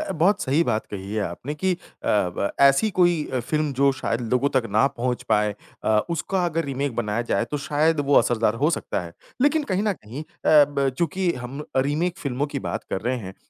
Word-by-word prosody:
अ, 310 - -3
बहुत 185 +4 +2
सही 145 +3 +2
बात 110 - -1
कही 100 0 -6
है 110 - 0
आपने 100 - -5
कि 190 +5 0
अ, 175 - -4 0.3
ब 100 -1 +1
ऐसी 140 +10 +5
कोई 175 -4 +4
अ, 130 - 0
फ़िल्म 150 +4 -1
जो 140 +1 +3
शायद 120 -3 -2
लोगों 125 +3 +3
तक 130 -3 +2
ना 110 +5 +4
पहुँच 125 -2 -2
पाए 105 -1 +2 0.3
अ, 110 -1 +3
उसका 180 +3 -1
अगर 165 -1 -1
रीमेक 140 -1 -2
बनाया 110 0 -1
जाए - - +2
तो 150 - -1
शायद 155 +1 +2
वो 145 0 +1
असरदार 115 -2 +2
हो 155 - +4
सकता - - -2
है। 85 - -9 0.3
लेकिन 300 +2 +3
कहीं 190 +2 +1
न 210 -2 +1
कहीं 125 - -8
अ, - - -13 0.2
ब 145 -2 +5
चूँकि 175 +2 0
हम 125 +3 -7 0.2
अ, - - +5
रीमेक 160 +7 -1
फ़िल्मों 140 -4 -2
की 145 - -4
बात - - -4
कर 95 - -1
रहे 125 +4 -1
हैं, 95 -5 -7
140 Hz, 220 wpm, -24 LUFS, 115-165 Hz, 0.3 s, ऐसी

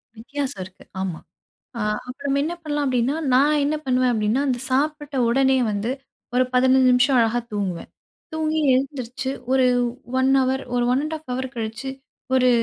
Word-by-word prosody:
வித்தியாசம் 275 +1 -4
இருக்கு. 185 0 -14 0.2
ஆமா. 180 -4 -3 0.6
அ - - -4 0.3
அப்புறம் 260 +3 -6
நம்ம 280 0 +2
என்ன 335 - -2
பண்ணலாம் 295 -1 -1
அப்படின்னா, 255 +2 +1 0.2
நான் 290 +3 +4
என்ன 300 +2 +1
பண்ணுவேன் 255 -1 +2
அப்படின்னா, 220 +4 +1
அந்த 250 -2 0
சாப்பிட்ட 295 +1 0
உடனே 265 +2 +3
வந்து 205 +4 -2 0.4
ஒரு 255 - +5
15 260 +1 +5
நிமிஷம் 250 +2 +4
அழகா 230 +1 +2
தூங்குவேன். 190 -4 -3 0.4
தூங்கி 315 0 0
எழுந்திரிச்சு 260 -1 -2 0.2
ஒரு 260 -1 +4 0.5
1 260 +1 +3
அவர் 260 +1 0
ஒரு 245 - +2
1-1/2 270 -2 -2
கழிச்சு 225 +3 -4 0.5
ஒரு 255 -1 +4
260 Hz, 145 wpm, -23 LUFS, 240-280 Hz, 0.6 s, ஒரு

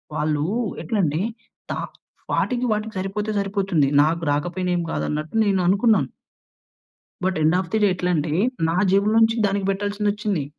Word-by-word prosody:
వాళ్ళు 150 -1 0 0.4
ఎట్ల 225 - -3
అంటే 155 +4 -1 0.5
తా - - -2 0.5
వాటికి, 250 -1 0
వాటికి 215 +1 -4
సరిపోతే 210 +3 -3
సరిపోతుంది. 195 -7 +1 0.2
నాకు 165 +2 0
రాకపోయినా 175 +5 -1
ఏమి 175 -1 -1
కాదు - - -2
అన్నట్టు 155 +6 -4
నేను 195 -2 +2
అనుకున్నాను. 210 +4 +3 1.2
But, 185 -2 0
end 160 +3 +4
of 185 - -4
the 220 - +3
day - - +6
ఎట్లంటే, 165 -4 0 0.4
నా 170 - 0
జేబులో 200 +3 +3
నుంచి 225 +1 +3
దానికి 195 0 -1
పెట్టాల్సిందొచ్చింది. 205 -4 -1
195 Hz, 145 wpm, -22 LUFS, 165-210 Hz, 1.2 s, day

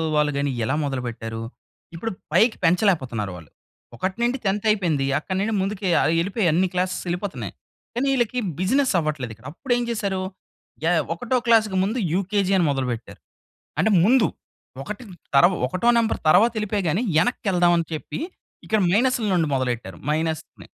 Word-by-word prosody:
వాళ్ళు 150 0 +3
గాని 140 0 0
ఎలా 130 +6 0
మొదలుపెట్టారు. 120 -4 -4 0.5
ఇప్పుడు 225 +7 -3 0.2
పైకి 220 +7 +4
పెంచలేకపోతున్నారు 155 - +1
వాళ్ళు. 80 -4 -12 0.5
ఒకటి 190 +2 -3
నుండి 240 +2 +1
10త్ 200 +2 0
అయిపోయింది. 170 -10 +1
అక్కడి 185 +4 -4
నుండి 215 +3 0
ముందుకు 195 +1 -3 0.2
ఆయి 160 - +2
వెళ్ళిపోయి. 195 +4 0
అన్ని 180 +4 +2
క్లాసేస్ 185 0 -1
వెళ్ళిపోతున్నాయి. 180 +3 -4 0.4
కానీ 255 +3 0
ఈళ్ళకి 250 -1 0 0.2
బిజినెస్ 255 +8 +2
అవ్వట్లేదు 150 -7 -3
ఇక్కడ. 115 +3 -22
అప్పుడు 255 +8 -1
ఏం 245 - -1
చేశారు 200 -4 -1 0.7
యాహ్! 175 +2 +3
యాహ్! - - +1
ఒకటో 245 +9 -1
క్లాస్‌కి 220 -4 +3
ముందు 215 +6 -1 0.2
యూకేజీ 195 +1 0
అని 175 - +3
మొదలుపెట్టారు. 125 -4 -4 0.6
అంటే 220 - +3
ముందు 235 +1 +5 0.6
ఒకటి 210 - -7 0.3
తరు 140 +6 +7 0.2
ఒకటో 185 - 0
నంబర్ 225 -1 +1
తర్వాత 195 +9 +6
వెళ్ళిపోయి 210 -1 -1
గాని 175 +8 +1
వెనక్కి 245 - +1
వెళ్దాం 175 -1 +4
అని 165 -1 0
చెప్పి 155 - -5 0.5
ఇక్కడ 215 -1 +2
మైనస్‌ల 245 +4 +2
నుండి 165 -4 +2
మొదలెట్టారు. 120 -8 -2
మైనస్‌ని. 160 +1 -3
185 Hz, 155 wpm, -23 LUFS, 150-215 Hz, 0.7 s, తరు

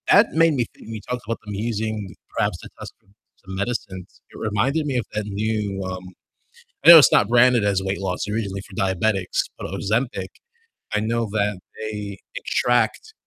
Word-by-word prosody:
That 205 +3 +6
made 165 0 +4
me 125 -4 +1
think - - -16
when 115 - -6
you 110 - -6
talked 125 0 -2
about 115 - -2
them 105 - -6
using 110 -2 -3 0.2
perhaps - - 0
to - - -11
test - - -8
for - - -37 0.4
some 95 0 -7
medicines, 100 -3 -4
it - - -13
reminded 130 +9 0
me 135 -3 -1
of 120 - -1
that 105 0 -2
new, 105 -1 -2
um 95 0 -5 0.8
I - - +5
know 170 -1 +13
it's 150 - +6
not 100 - +5
branded 120 -1 +5
as 100 -2 +1
weight 95 +1 -2
loss, 90 -2 -2
originally 100 -3 -3
for 100 - -14
diabetics, 95 +1 0 0.2
but - - -6
Ozempic. 115 +6 -1 0.7
I 105 - +2
know 115 +1 -1
that 105 -2 0 0.2
they 105 -2 -5 0.2
extract, 120 - 0
105 Hz, 185 wpm, -23 LUFS, 100-120 Hz, 0.8 s, know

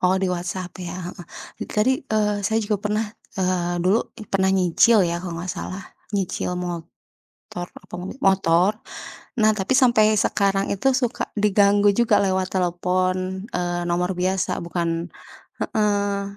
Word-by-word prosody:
Oh, 185 +1 +3
di 190 - +2
WhatsApp 180 +1 -4
ya, 180 0 -5
heeh, 175 -1 -8 0.4
itu - - -6
tadi, 250 +5 +4 0.2
eee, 210 -1 +1
saya 220 +1 +1
juga 210 0 0
pernah, 215 +2 0 0.3
eee, 180 -2 0
dulu 200 +5 +4 0.2
i - - -7
pernah 190 -1 +3
nyicil 190 +3 +4
ya 170 0 -1
kalau 175 -2 -5
gak 185 - -3
salah 190 +2 -6 0.3
nyicil 180 -1 -2
motor 175 -2 -6 0.8
apa - - -12
mobil 190 +8 -7
motor. 190 -1 +3 0.7
Nah, 215 0 +5
tapi 195 +1 -3
sampai 235 -4 +5
sekarang 195 0 +1
itu 270 +7 +2
suka 240 - -1 0.2
diganggu 205 0 +4
juga 235 -1 +3
lewat 190 -1 +1
telepon, 185 +1 +1 0.4
eee, 175 0 -1
nomor 180 +1 0
biasa 185 +1 0
bukan 170 0 -2 0.5
heeh. 200 -2 0
190 Hz, 145 wpm, -23 LUFS, 180-205 Hz, 0.8 s, Nah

